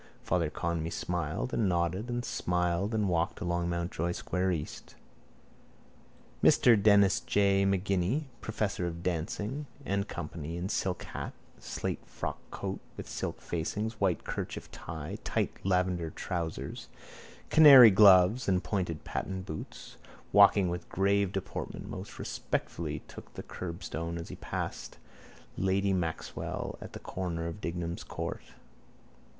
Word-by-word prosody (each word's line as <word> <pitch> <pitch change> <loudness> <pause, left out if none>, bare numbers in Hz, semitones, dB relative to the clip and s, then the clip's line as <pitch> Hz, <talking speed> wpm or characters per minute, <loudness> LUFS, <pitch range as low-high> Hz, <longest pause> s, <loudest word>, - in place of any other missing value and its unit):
Father 85 -3 +1
Conmee 85 +1 -2
smiled 85 - -2
and 105 -4 +2
nodded 90 +6 0
and 120 0 -2
smiled 90 +4 0
and 105 -2 +1
walked 85 -1 0
along 85 0 -1
Mountjoy 85 0 -1
square 95 +1 -1
east. 80 -4 -5 1.5
Mr 120 - +7
Denis 100 -2 +5
J 100 -1 +3
Maginni, 95 - +1 0.2
professor 100 -4 -1
of 85 0 -6
dancing 105 - -2 0.2
&c, 100 -4 -2 0.4
in 90 +2 -3
silk 95 -3 -1
hat, - - -6 0.3
slate - - -4
frockcoat - - -5 0.2
with - - -6
silk - - -4
facings, 105 +7 -3
white 95 -3 +2
kerchief - - -5
tie, 80 -2 -6
tight - - -2
lavender 90 -3 +1
trousers, 85 +1 -4 0.6
canary 135 -7 +10
gloves 95 +3 +6
and 90 -1 +2
pointed 90 -6 -2
patent 95 -1 -4
boots, 80 - -8 0.3
walking 100 -1 +7
with 85 0 -5
grave 100 0 +2
deportment 95 -2 -5
most - - -7
respectfully 75 -3 -3
took - - -11
the - - -6
curbstone 85 -1 -5
as 85 - -6
he - - -6
passed - - -5 0.6
lady 95 +1 +2
Maxwell 85 -3 -3
at - - -9
the - - -6
corner 85 -3 -4
of 85 +5 -5
Dignam's 85 -1 -3
court. - - -5
90 Hz, 125 wpm, -30 LUFS, 85-100 Hz, 1.5 s, canary